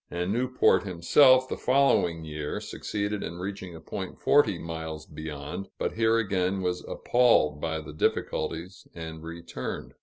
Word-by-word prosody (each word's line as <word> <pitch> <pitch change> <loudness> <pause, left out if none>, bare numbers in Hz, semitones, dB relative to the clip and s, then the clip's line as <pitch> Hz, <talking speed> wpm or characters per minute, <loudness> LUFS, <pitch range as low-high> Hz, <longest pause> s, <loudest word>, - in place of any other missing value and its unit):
and 90 +3 -2
Newport 130 +2 +3
himself, 130 - +5
the - - -3
following 125 -11 +2
year, 75 -1 -4
succeeded 105 0 -3
in 85 - -5
reaching 95 -1 -6
a - - -9
point 95 +4 -6
forty 110 -10 +4
miles 80 -2 -6
beyond, 75 +4 -7
but - - -1
here 115 0 +3
again 95 -3 0
was 90 0 -1
appalled 115 -12 +3
by 80 -1 -1
the 75 -1 -9
difficulties 90 +4 -2
and 80 -1 -7
returned. 85 +1 -6
90 Hz, 145 wpm, -27 LUFS, 80-105 Hz, -, himself